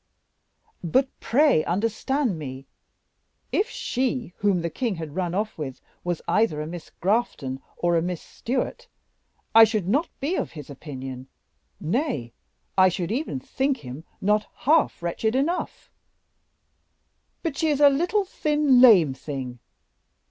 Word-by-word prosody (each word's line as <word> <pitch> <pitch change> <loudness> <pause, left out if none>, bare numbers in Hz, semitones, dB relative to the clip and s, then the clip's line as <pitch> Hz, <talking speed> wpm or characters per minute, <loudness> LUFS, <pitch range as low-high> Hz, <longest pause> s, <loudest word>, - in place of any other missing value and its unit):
"But, 260 - +2
pray 270 - +3
understand 225 - 0
me. 135 -2 -7 0.9
If 430 +4 +1
she 250 - -2
whom 195 -3 +2
the 170 - -1
king 235 -6 -1
had 160 -3 -7
run 180 -2 -1
off 210 -2 -2
with 135 -4 -5 0.2
was 175 -2 -2
either 170 -3 +2
a 150 - -3
Miss 165 0 -8
Grafton 170 - 0 0.2
or 175 0 +1
a 165 - +3
Miss 175 0 -2
Stewart, 265 - -4 0.7
I 225 - +10
should 215 -4 +2
not 285 - +1
be 295 +7 -1
of - - -3
his 150 -3 -9
opinion; 130 -3 -7 0.5
nay, 165 - -1 0.4
I 185 -1 +6
should 180 +1 -3
even 245 - -2
think 270 - -1
him 130 +5 -7 0.2
not 210 +2 +2 0.2
half 300 - +3
wretched 220 +7 -1
enough; 320 +7 -2 1.5
but 325 -5 -2
she 320 - 0
is 295 -2 +1
a 290 - +8
little, 350 +9 +1
thin, 295 -7 +3
lame 185 - +7
thing. 130 -3 -6
205 Hz, 140 wpm, -25 LUFS, -, 1.5 s, I